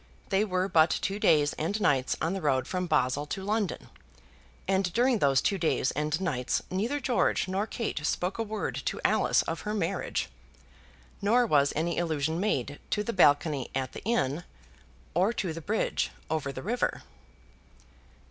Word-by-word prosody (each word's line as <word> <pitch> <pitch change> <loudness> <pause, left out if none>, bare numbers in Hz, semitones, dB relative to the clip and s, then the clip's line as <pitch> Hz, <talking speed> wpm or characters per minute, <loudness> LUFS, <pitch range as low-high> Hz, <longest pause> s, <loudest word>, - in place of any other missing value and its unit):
They 195 +1 +3
were 185 -2 0
but 160 -4 +5
two 195 +5 -1
days 150 -6 +4
and 200 +7 -1
nights 135 -9 +2
on 165 +4 0
the 195 - -3
road 130 -4 +1
from 180 -1 -2
Basle 145 -2 +1
to 190 +5 -4
London; 205 -2 -2 0.8
and 190 -1 +1
during 245 -1 +3
those 135 -5 +3
two 195 -2 +1
days 160 -5 +1
and 150 +3 -1
nights 130 -10 0
neither 225 +10 -1
George 250 -8 +1
nor 195 +3 -1
Kate 220 -10 -3
spoke 180 +6 -1
a - - +1
word 215 -1 -3
to - - -2
Alice - - +3
of - - -4
her 210 0 -3
marriage, 205 - -1 0.9
nor 235 +5 +4
was 145 -8 +3
any 170 +3 0
allusion 160 -1 -1
made 145 - -1
to 210 - 0
the 235 - -3
balcony 145 -5 +3
at 130 -1 -1
the - - -8
inn, 175 - 0 0.7
or 185 +6 +3
to 185 -7 -2
the 165 - -7
bridge 210 +7 0 0.2
over 155 -3 -1
the 130 -1 -7
river. 240 +5 -1
175 Hz, 165 wpm, -28 LUFS, 145-210 Hz, 0.9 s, but